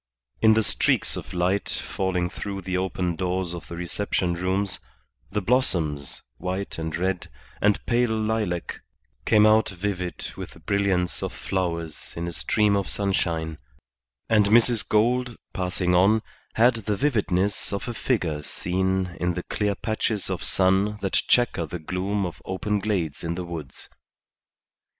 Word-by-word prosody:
In 110 -1 +6
the 110 - +3
streaks - - +1
of - - -7
light 90 +3 0
falling 90 -2 0
through 100 +2 -5
the 90 0 -3
open 90 -2 -1
doors 90 0 -1
of 85 - -7
the 85 - -7
reception 90 0 -1
rooms, 95 +2 -1 0.5
the 105 0 -2
blossoms, 80 - 0
white 95 +2 -3
and 80 -1 -3
red 90 +1 -1 0.3
and 105 0 +2
pale 120 0 +2
lilac, 110 -5 -1 0.5
came 105 -1 +6
out 110 +1 +5
vivid 90 -1 -4
with - - -7
the - - -15
brilliance 100 -3 +1
of - - -2
flowers 85 -4 -3
in 85 +1 -2
a 85 - -4
stream 105 +3 +2
of 100 -2 -1
sunshine; 85 -5 -1 0.7
and 105 -2 +4
Mrs. 115 +1 +4
Gould, 120 +2 +2 0.2
passing 90 -1 0
on, 100 +5 +5 0.3
had 120 +3 +6
the 105 -3 -2
vividness 105 -8 +1
of 100 +3 -3
a 120 - -2
figure 90 - 0
seen 95 +3 -1
in 90 0 0
the 90 - -3
clear 105 -1 -1
patches 110 -2 -1
of 90 - -3
sun 95 +3 +2
that 95 - -2
chequer 110 -9 +3
the 90 - -4
gloom 95 +5 -1
of 85 - -6
open 105 +2 -1
glades 90 -9 -1
in 85 0 -2
the 90 0 -4
woods. 80 -6 -8
95 Hz, 150 wpm, -25 LUFS, 90-105 Hz, 0.7 s, In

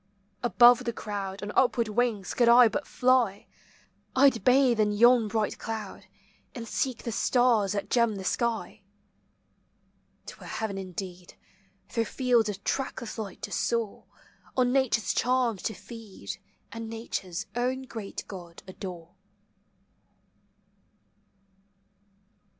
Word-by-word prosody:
Above 245 +1 +6
the 235 - 0
crowd 200 -2 -5
On 205 - -4
upward 245 -3 +3
wings 215 -3 -1
could 240 -1 +3
I 240 0 +8
but 260 - -3
fly, 250 -6 +2 0.7
I 275 +1 +7
'd 230 - -8
bathe 255 -2 +4
in 210 -1 +3
yon 235 +2 +5
bright 215 0 -1
cloud, 220 -3 -6 0.5
And 235 -2 -6
seek 255 +1 -2
the 235 - -3
stars 230 -4 +2
that 200 -1 -3
gem 235 -3 +3
the 195 - -6
sky. 230 +2 -2 1.4
'T - - -8
were - - -11
heaven 220 -3 -3
indeed 185 -1 -7 0.5
Through 230 -1 -1
fields 240 -3 +2
of 200 -1 -6
trackless 260 -4 -3
light 200 -4 -7
to - - -5
soar, 230 -3 -1 0.5
On 250 -1 +3
Nature's 255 -6 +2
charms 245 -5 +1
to 220 - -3
feed, 215 +1 -9 0.3
And 230 -1 -6
Nature's 205 -5 -4
own 255 +2 -1
great 225 -5 -7
God 175 -3 -10
adore. 180 -3 -8
225 Hz, 125 wpm, -28 LUFS, 200-245 Hz, 1.4 s, I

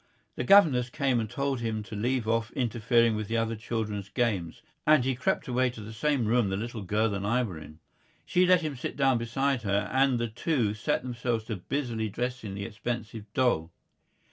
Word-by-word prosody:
The - - -2
governess 130 -7 +5
came 135 -3 +1
and 110 -2 -3
told 140 0 -1
him 110 -2 -2
to 105 - -8
leave 120 +2 -1
off 115 -1 +1
interfering 115 -2 +2
with 105 -1 -3
the 115 - -1
other 115 0 0
children's 105 -3 -4
games, 100 -10 -1 0.2
and 150 -5 +5
he 130 - +1
crept 125 - -1
away 130 0 +2
to 120 - -10
the 105 +1 -8
same 135 +2 +1
room 115 -1 +2
the 95 - -1
little 115 +1 -5
girl 105 +3 0
and 100 0 -3
I 115 +5 +2
were 90 -9 -5
in. 75 0 -12 0.5
She 180 0 +3
let 180 -1 +5
him 155 -3 -3
sit 125 - -5
down 135 -3 +3
beside 130 +3 0
her, 100 -1 0
and 135 -1 +3
the 120 0 -1
two 115 -1 0
set 105 +3 -1
themselves 120 -2 -2 0.2
busily 120 -6 -1
dressing 120 -2 -4
the 100 0 -4
expensive 110 -1 -5
doll. 105 -11 +1
115 Hz, 195 wpm, -28 LUFS, 110-130 Hz, 0.5 s, governess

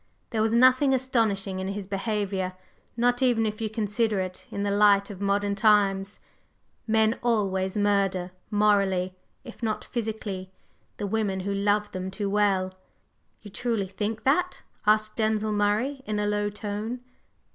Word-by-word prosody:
There 220 - 0
was 220 +1 +2
nothing 255 +3 +5
astonishing 220 -7 0
in 190 - -3
his 200 0 -4
behavior, 195 -1 -2 0.4
not 245 +1 +2
even 240 -3 +3
if 215 0 -3
you 220 - -1
consider 215 -1 0
it 185 -1 -5
in 200 - -3
the 200 - 0
light 200 0 +4
of 195 -1 -9
modern 200 0 +1
times. 200 -1 +2 0.7
Men 220 +1 +2
always 195 -5 0
murder 195 -3 +1 0.2
morally, 200 -3 +2 0.3
if 245 -2 -11
not 220 -2 -1
physically 210 -5 -4 0.5
the 205 - -3
women 200 -2 -1
who 200 +2 -2
love 205 +1 +1
them 185 0 -4
too 200 +1 -3
well." 195 -2 +2 0.7
"You 205 - -11
truly 230 -2 -1
think 210 +3 -4
that?" 350 +7 +1 0.2
asked 215 0 +3
Denzil 215 -1 +1
Murray 210 +7 0
in 215 -1 -1
a 210 - 0
low 205 0 0
tone. 210 +3 -4
210 Hz, 150 wpm, -26 LUFS, 195-220 Hz, 0.7 s, nothing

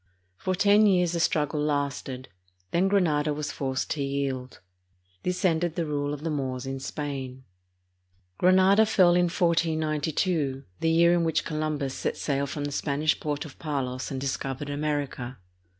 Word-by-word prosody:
For 185 - -2
ten 205 +3 +5
years 180 -3 +3
the 170 - -1
struggle 150 -1 +1
lasted; 140 -3 -2 0.4
then 180 +3 +3
Granada 155 -7 +2
was 150 -1 -3
forced 130 -1 -2
to 150 - -1
yield. 135 -2 -3 0.6
This 180 +2 -1
ended 165 -1 +1
the 170 - -1
rule 145 -1 -2
of 145 0 -5
the 165 - -1
Moors 130 -3 -3
in 135 0 -4
Spain. 135 -2 -5 1.0
Granada 190 +4 +5
fell 185 -5 +5
in 175 0 +4
1492, 160 -4 0 0.2
the 165 - +1
year 170 +1 +5
in 175 -1 +2
which 160 -1 0
Columbus 155 -3 -2
set - - -3
sail 140 -1 -1
from 145 +1 -4
the 145 - -3
Spanish 150 +2 0
port 150 0 -3
of 145 - -12
Palos 130 -4 -3
and 135 - -4
discovered 135 +1 -3
America. 145 -4 -3
150 Hz, 155 wpm, -27 LUFS, 140-170 Hz, 1.0 s, ten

